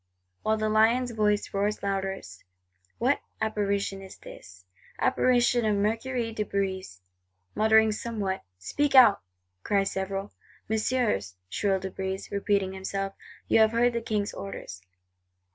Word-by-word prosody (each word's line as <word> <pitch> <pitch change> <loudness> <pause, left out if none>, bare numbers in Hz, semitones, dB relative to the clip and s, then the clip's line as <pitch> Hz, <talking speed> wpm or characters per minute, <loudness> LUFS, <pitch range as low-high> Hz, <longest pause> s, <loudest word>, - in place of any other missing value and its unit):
while 220 0 +1
the 215 0 0
lion's 230 +3 +3
voice 210 -2 0
roars 205 +1 -1
loudest, 195 - -3 0.5
what 260 +5 +2 0.2
Apparition 200 -2 -1
is 190 -1 -11
this? 90 0 -13 0.3
Apparition 245 -2 +3
of 215 -1 +2
Mercurius 225 +3 -1
de 210 - +1
Brézé, 190 - -3 0.5
muttering 220 0 +4
somewhat!—'Speak 205 - -2
out,' 250 -6 +8 0.4
cry 200 - +2
several.—'Messieurs,' 195 - -2 0.2
shrills 195 -2 0
De 190 - -4
Brézé, 190 +1 -4
repeating 200 -1 0
himself, 195 +1 -3 0.3
'You - - +4
have 220 0 +5
heard 240 +1 +3
the 235 - -1
King's 210 -2 -2
orders! 100 - -7
205 Hz, 120 wpm, -27 LUFS, 195-220 Hz, 0.5 s, out